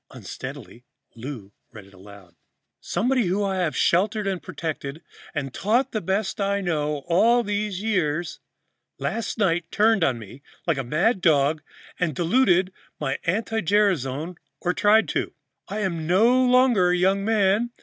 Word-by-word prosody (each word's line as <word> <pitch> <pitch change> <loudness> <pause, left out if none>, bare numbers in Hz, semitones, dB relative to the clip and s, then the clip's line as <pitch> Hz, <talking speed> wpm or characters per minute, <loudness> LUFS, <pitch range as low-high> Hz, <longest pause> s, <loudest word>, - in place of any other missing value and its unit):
Unsteadily, 120 - -9 0.3
Lou 115 -5 -8 0.2
read 105 -3 -12
it 100 - -20
aloud: 95 -2 -15 0.5
"'Somebody 250 -2 0
who 195 +4 0
I 195 -1 -1
have 175 -4 -1
sheltered 205 +4 +2
and 190 -2 -2
protected 155 -1 -6 0.3
and 135 -3 -3
taught 240 - +1
the 215 - -2
best 190 +3 -2
I 200 0 0
know 150 -5 -1
how - - -29
all 235 +5 +4
these 205 -2 -3
years 175 -6 -1 0.6
last 230 +1 -3
night 175 -5 0
turned 215 -3 +3
on 130 -6 +1
me 115 +4 -11 0.2
like 165 -5 0
a - - -2
mad 175 - +1
dog 150 -1 +3 0.4
and 170 -6 -1
diluted 185 - +2 0.3
my 135 -2 -2
anti 220 +5 -1
gerasone, 175 -5 0 0.2
or 180 - -1
tried 210 +4 +4
to. - - -2 0.3
I 210 +2 -4
am 170 -5 -2
no 235 +8 +4
longer 245 -7 +4
a 180 - +2
young 190 +2 +2
man. 215 +1 +2
185 Hz, 155 wpm, -24 LUFS, 150-210 Hz, 0.6 s, all